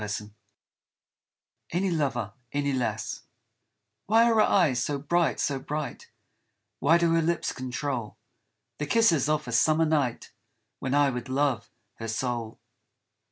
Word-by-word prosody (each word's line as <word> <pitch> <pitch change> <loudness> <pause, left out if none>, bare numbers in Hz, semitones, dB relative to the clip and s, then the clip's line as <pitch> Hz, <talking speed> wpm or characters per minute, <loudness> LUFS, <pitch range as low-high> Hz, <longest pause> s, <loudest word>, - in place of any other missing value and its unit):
70 105 0 -5 1.4
ANY 185 +2 +1
LOVER, 130 - -1 0.2
ANY 140 -1 0
LASS 125 -2 -3 0.8
WHY 225 +3 +5
are - - +3
her 220 - +5
eyes 155 - +3
so 145 +3 -1
bright, 165 +4 +1
so 140 -2 0
bright, 150 +2 -5 0.7
Why 160 +5 +5
do 170 -1 +2
her 165 - +3
lips 170 +1 0
control 130 -2 -4 0.6
The 150 - -2
kisses 165 - +3
of 150 -2 0
a - - -4
summer 155 +7 +3
night, 145 -6 0 0.5
When 130 +1 -1
I 145 -1 +4
would 125 0 -5
love 130 -4 0 0.3
her 115 - -4
soul 115 0 -3
140 Hz, 135 wpm, -27 LUFS, 125-160 Hz, 1.4 s, WHY